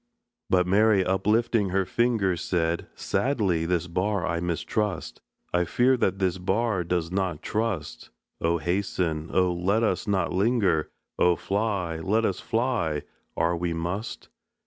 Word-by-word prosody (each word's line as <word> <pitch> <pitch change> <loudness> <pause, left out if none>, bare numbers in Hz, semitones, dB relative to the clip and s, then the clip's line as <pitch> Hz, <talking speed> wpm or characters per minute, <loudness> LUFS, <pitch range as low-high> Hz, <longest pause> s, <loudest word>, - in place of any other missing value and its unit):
But 90 -1 +3
Mary, 100 +1 +4
uplifting 105 +2 +2
her 95 +1 +1
finger, 110 -5 +1
Said: 85 -1 -1
"Sadly 95 -12 0
this 90 -1 0
bar 95 +2 -1
I 85 -2 -1
mistrust, 90 +3 -2 0.3
I 90 0 +3
fear 125 +8 +3
that 95 -6 0
this 95 -1 0
bar 95 +1 0
does 85 -1 -1
not 90 -5 -2
trust. 105 - -3 0.3
Oh, 85 +1 +2
hasten! 85 -2 -1
oh, 90 -1 +2
let 95 +6 +1
us 110 - 0
not 95 -3 0
linger! 95 -5 +2 0.3
Oh, 90 -1 +4
fly, 100 -4 -1
let 105 +7 +1
us 95 - -1
fly, 115 - -1 0.3
are 85 +1 +2
we 85 0 -2
must!" 90 +6 -4
95 Hz, 140 wpm, -26 LUFS, 85-105 Hz, 0.3 s, Mary